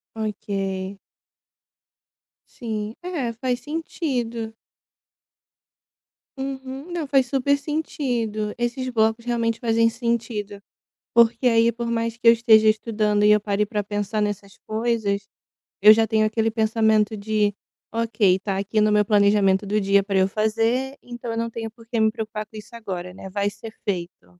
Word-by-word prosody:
Ok. 195 -3 -3 1.5
Sim, 220 -2 -5
é, 315 -10 -3
faz 245 +2 -2
sentido. 245 -6 -3 1.8
Uhum. 270 +3 -6
Não, 335 -4 -3
faz 270 -2 +3
super 280 +2 +1
sentido, 245 -8 -2
esses 240 +2 -2
blocos 225 -1 +1
realmente 230 -2 -1
fazem 230 -1 +3
sentido. 225 -4 -3 0.5
Porque 235 +2 +4
aí 230 0 +4
por 235 +1 -5
mais 230 0 -1
que 235 0 +3
eu - - +10
esteja 220 -2 +5
estudando 215 -1 +1
e 210 - +6
eu 210 - +4
pare 205 0 0
para 210 -1 -2
pensar 205 +1 -2
nessas 205 -1 -4
coisas, 215 -3 -1 0.5
eu 210 +2 +10
já 225 +1 +4
tenho 220 0 +2
aquele 225 +1 0
pensamento 220 -1 +2
de: 210 0 0 0.4
"Ok 225 -4 +2
está 195 0 -3
aqui 210 +2 0
no 210 0 +4
meu 210 0 +4
planejamento 200 -1 +3
do 210 +2 +1
dia 195 0 +3
para 195 -1 0
eu 190 - +4
fazer, 225 +6 0
então 240 -1 -7
eu 225 - -3
não 230 0 -1
tenho 225 -1 -5
porque 230 +1 -5
me 220 0 +4
preocupar 215 -1 -5
com 220 - -15
isso 215 +2 -11
agora, 180 -5 -6
né, 190 0 -9
vai 200 +1 0
ser 220 +2 -9
feito." 175 - -4
220 Hz, 150 wpm, -23 LUFS, 210-235 Hz, 1.8 s, eu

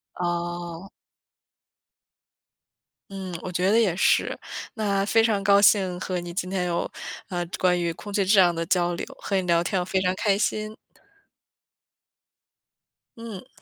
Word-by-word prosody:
哦。 175 +1 -4 2.2
嗯， 190 -2 -6
我 185 - -5
觉 180 +2 +1
得 230 +2 +5
也 185 -6 +1
是。 - - +2 0.4
那 200 -3 0
非 225 +1 +4
常 210 -3 +1
高 200 0 +5
兴， 190 -3 +4
和 180 -1 -3
你 175 0 -7
今 180 0 -3
天 180 -2 -1
有， 170 -1 -2 0.4
呃， 175 -2 -2 0.2
关 180 -1 +3
于 170 -1 0
空 205 +4 -9
气 200 - +2
质 200 +2 +3
量 175 -2 +5
的 165 0 -3
交 175 -1 +1
流， - - -5
和 200 - -4
你 190 - +1
聊 170 0 +3
天 180 +1 0
非 190 - 0
常 180 0 +1
开 195 +1 +1
心。 215 +1 -2 2.4
嗯。 225 -5 -9
185 Hz, 160 characters per minute, -25 LUFS, 175-200 Hz, 2.4 s, 得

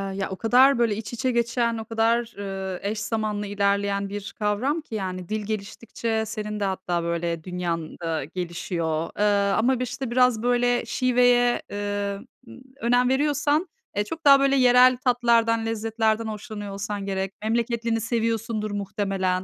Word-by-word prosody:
ya 195 -1 -2
o 190 - -4
kadar 250 +5 +4
böyle 230 -3 +2
iç 215 +1 -7
içe 255 +2 0
geçen, 235 -1 0
o 220 - -6
kadar, 230 +1 +1
ııı, 190 -2 -4
eş 210 +2 -2
zamanlı 215 -2 -2
ilerleyen 200 0 0
bir 205 +1 -6
kavram 225 +10 0
ki 265 -7 -8
yani 185 -3 -4
dil 215 -1 -2
geliştikçe 220 +2 -3
senin 210 -1 -5
de - - -1
hatta 185 -3 -1
böyle 170 -1 -2
dünyan 175 -3 -4
da 165 -2 -2
gelişiyor. 170 -1 -3
Iıı, 200 -1 +3
ama 250 +3 +2
bir - - 0
işte 250 0 -5
biraz 250 -2 +3
böyle 245 0 +2
şiveye, 245 0 +3
ııı, 205 +1 -3 0.6
önem 245 +1 +3
veriyorsan, 295 +4 +1 0.3
eee, 205 - +1
çok 320 +10 -8
daha 275 -1 +8
böyle 275 0 +3
yerel 250 -1 +6
tatlardan, 235 -2 +2
lezzetlerden 225 0 0
hoşlanıyor 210 -1 -6
olsan 200 0 -4
gerek. 195 -1 -2
Memleketlini 230 0 0
seviyorsundur 225 -2 -1
muhtemelen. 195 -2 -1
220 Hz, 150 wpm, -24 LUFS, 200-240 Hz, 0.6 s, daha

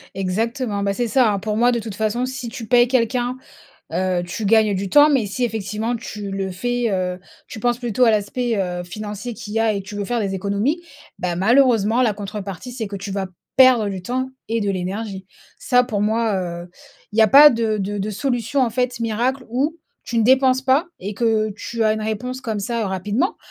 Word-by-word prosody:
Exactement, 205 +3 -1
bah, 200 0 0
c'est 240 +3 -1
ça, 235 -2 +3
hein, 200 - -1
pour 210 +1 -3
moi 240 +2 +4
de 235 - 0
toute 220 -3 -7
façon, 220 +4 0
si 255 -2 -5
tu 230 -3 -8
payes 240 +2 +5
quelqu'un, 250 0 0 0.6
heu, 185 -1 0
tu 205 +4 -4
gagnes 215 -1 +4
du 195 +1 -2
temps 295 +8 +6
mais 260 -7 +2
si 225 +5 -2
effectivement 220 +1 -2
tu 210 -3 -6
le 195 -1 -3
fais, 245 +6 -1
heu, 185 -1 -2 0.3
tu 220 - -9
penses 240 0 +1
plutôt 245 0 +1
à - - +6
l'aspect, 225 +3 0
heu, 180 -2 -2
financier 210 +5 -6
qu'il 210 0 -8
y 225 - +1
a 220 -2 +2
et 200 - -3
tu 195 +2 -10
veux 205 -1 -3
faire 240 -1 -1
des 195 -2 -2
économies, 200 - -1 0.4
bah, 175 -1 -2
malheureusement 230 +1 +3
la 220 -4 +2
contrepartie 205 +2 -6
c'est 235 -3 -4
que 200 - -6
tu 200 +1 -6
vas 195 -1 -2 0.3
perdre 255 -5 +6
du 190 -2 -5
temps 255 +6 -2 0.2
et 230 0 0
de 205 - 0
l'énergie. 190 +1 -4 0.3
Ça, 250 -1 +3
pour 220 -5 -2
moi, 220 0 +1
heu, 175 -1 -5 0.4
il 220 - -4
y - - +8
a 220 - +5
pas 290 +4 +9
de 225 -3 0
de 205 +1 -3
de 205 +2 -2
solution 245 +3 -1
en 240 - +1
fait 250 +1 -1
miracle, 240 +4 -1
où, 280 +7 0 0.3
tu 235 - -2
ne - - +4
dépenses 260 +2 +4
pas 270 +6 +3
et 200 +3 -5
que 220 -1 +1
tu 230 +1 -3
as 215 -1 +3
une 220 - -3
réponse 245 +4 -3
comme 220 -5 -3
ça, 230 +3 -2
heu, - - -1
rapidement. 205 - -1
220 Hz, 220 wpm, -21 LUFS, 200-245 Hz, 0.6 s, pas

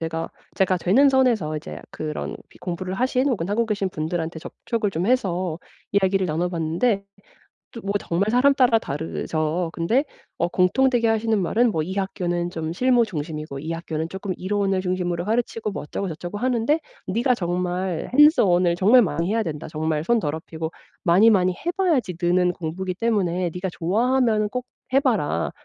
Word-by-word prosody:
제가 165 0 -3 0.3
제가 190 -1 +2
되는 225 +11 +4
선에서 235 - +2
이제 75 - -7
그런 75 -1 -5
비 - - -20
공부를 180 +1 -4
하신 255 +5 +1
혹은 190 -8 -1
하고 225 +3 +1
계신 205 -3 -1
분들한테 165 0 -3
접촉을 215 +5 -3
좀 175 +2 -2
해서 185 -9 0 0.3
이야기를 195 -1 +2
나눠 170 +2 -1
봤는데 180 +6 0 0.7
또 230 - -8
뭐 200 +1 -2
정말 190 +5 -1
사람따라 250 -2 +4
다르죠. 160 +2 -2
근데 230 - +1 0.3
어 170 - +1
공통되게 230 +7 +2
하시는 225 0 +1
말은 230 +6 +2
뭐 160 -3 -1
이 185 +4 -5
학교는 175 -3 -2
좀 160 -2 -4
실무 245 +4 +3
중심이고 155 -5 -5
이 160 +3 -5
학교는 160 -1 -4
쪼끔 190 +1 -5
이론을 195 0 0
중심으로 180 -2 -2
가르치고 225 -1 -1
뭐 - - -5
어쩌고저쩌고하는데 210 - -1 0.3
"네가 240 +6 +2
정말 180 -1 -2
hands 295 +4 +7
on을 175 -2 +3
정말 220 +7 +6
많이 170 -3 -1
해야 225 0 +1
된다. 150 -4 -5
정말 155 0 -2
손 235 +3 +3
더럽히고 160 -1 -4 0.3
많이 190 +6 +6
많이 185 -3 +3
해 345 - -3
봐야지 265 - +1
느는 180 +1 +2
공부기 180 +3 -4
때문에 185 -5 0
네가 180 +1 -3
좋아하면은 220 +4 +1
꼭 250 +1 -4 0.3
해 270 - +5
봐라." 205 - 0
185 Hz, 375 characters per minute, -23 LUFS, 170-225 Hz, 0.7 s, hands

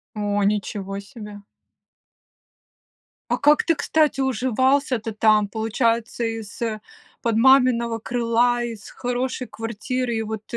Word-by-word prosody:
О, 205 -1 0
ничего 200 -1 -2
себе! 210 -1 -10 1.9
А - - +2
как 295 +1 +4
ты, 330 - +2
кстати, 305 -2 +1
уживался-то 260 -1 +1
там? 215 -1 +3
Получается, 230 +2 -1 0.2
из-под 220 +1 -5
маминого 235 -2 +4
крыла, 240 +1 +1
из 230 -3 -7
хорошей 250 +1 -3
квартиры, 235 +2 -3
и 225 - -1
вот 220 -1 -5
230 Hz, 100 wpm, -22 LUFS, 215-255 Hz, 1.9 s, как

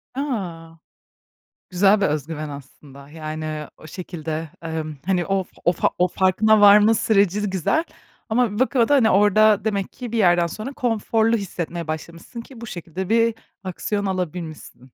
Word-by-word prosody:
A! 175 - -4 0.9
Güzel 200 +3 +3
bir - - +3
özgüven 155 +1 -3
aslında. 140 0 -12
Yani, 155 -1 -5
o 155 - -13
şekilde, 160 -3 -6
emm, 160 -2 -4
hani, 185 -2 +1
o 195 -2 0 0.2
o 175 - +5
fa - - 0
o 180 - +3
farkına 205 +4 +3
varma 205 +2 +7
süreci 205 -2 +2
güzel. 190 - 0 0.5
Ama 230 -1 +2
bir 210 - -5
bakıma 260 -3 +2
da, 290 - +4
hani, 225 -5 +4
orada 210 +2 +4
demek 200 -3 -1
ki 245 -3 -8
bir 230 - -2
yerden 175 -4 +4
sonra 215 - -7
konforlu 225 -2 +1
hissetmeye 170 -4 -5
başlamışsın 170 +8 -7
ki 235 0 -14
bu 235 - -7
şekilde 175 +1 -6
bir 230 0 +3 0.3
aksiyon 200 +2 -3
alabilmişsin. 170 -7 -5
190 Hz, 155 wpm, -22 LUFS, 165-220 Hz, 0.9 s, varma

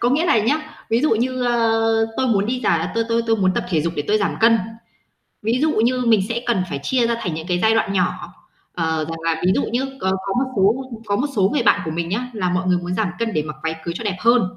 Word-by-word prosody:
có 240 - +2
nghĩa 310 +5 +2
là 230 - +4
nhá, 235 +9 +2 0.3
ví 230 +1 +3
dụ 305 - +2
như, 250 +3 0
ơ, 225 -2 +2
tôi 260 - +1
muốn 205 -4 +2
đi 250 +1 -2
giả 165 -3 +1
tôi 230 0 +1
tôi 230 0 +1
tôi 225 0 +2
muốn 185 -3 +1
tập - - -1
thể 165 -4 +1
dục 165 +2 -2
để 145 - 0
tôi 215 - +3
giảm 200 - 0
cân, 230 0 +5 0.8
ví 230 +3 +1
dụ 315 - +3
như 250 -1 +1
mình 225 -3 +5
sẽ 235 0 -2
cần 225 -6 +1
phải 140 -5 -3
chia 245 - +1
ra 235 - +1
thành 170 - -3
những 160 +2 -6
cái 180 -1 0
giai 220 +4 +3
đoạn 195 -3 +1
nhỏ, 180 -2 -1 0.4
ờ, 160 -2 -1
rằng 165 0 -5
là 165 -1 0
ví 185 - +4
dụ - - +1
nhớ 245 +3 -1
c - - -4
có 190 - +1
có 195 - -1
một 260 +1 0
số 210 +7 +2 0.2
có 200 -1 +1
một 260 - 0
số 190 -2 +4
người 295 - +1
bạn 220 - +4
của 160 - -3
mình 165 +1 -3
nhá, 245 +7 -3
là 185 -5 -1
mọi 185 +1 -1
người 180 -1 +3
muốn 175 +1 -4
giảm 215 0 0
cân 230 -1 -1
để 155 - +1
mặc 155 0 -7
váy 160 0 -1
cưới 170 -1 -3
cho 230 - -6
đẹp 200 -3 -1
hơn. 235 +3 +4
215 Hz, 290 wpm, -21 LUFS, 180-235 Hz, 0.8 s, cân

